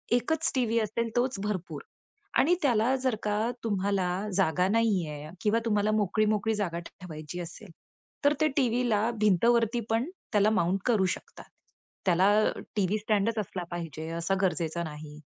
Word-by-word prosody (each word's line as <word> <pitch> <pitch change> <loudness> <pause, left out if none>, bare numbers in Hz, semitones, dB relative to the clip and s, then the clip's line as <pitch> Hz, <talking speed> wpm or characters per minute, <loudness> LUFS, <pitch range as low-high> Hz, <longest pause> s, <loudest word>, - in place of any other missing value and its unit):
एकच 320 +6 +1
टीव्ही 230 -2 +2
असेल, 225 +2 -1
तोच 245 -4 +1
भरपूर. 175 -8 -3 0.6
आणि 350 +6 +4
त्याला 245 0 +3
जर 255 -4 +1
का 215 +3 0
तुम्हाला 200 -3 0 0.3
जागा 180 0 +2
नाही 210 -6 +2
आहे 150 +1 -7
किंवा 220 +2 +2
तुम्हाला 210 -1 +2
मोकळी, 215 +1 +1
मोकळी 215 +1 +1
जागा 175 -5 -2
ठेवायची 160 -2 -8
असेल, 175 +3 -9 0.5
तर 290 - +6
ते 310 - +5
टीव्हीला 235 -3 +2
भिंतवरती 230 +4 +3
पण 230 +8 0 0.2
त्याला 205 +1 +4
माउंट 195 -2 +1
करू 215 -6 +3
शकतात. - - -14 0.6
त्याला 185 +2 +4 0.5
टीव्ही 205 +1 +1
स्टँडचं 215 +1 +1
असला 185 -2 -5
पाहिजे 165 -2 -5
असा 195 +3 0
गरजेचा 170 -2 0
नाही. 150 -1 -8
210 Hz, 145 wpm, -28 LUFS, 180-230 Hz, 0.6 s, तर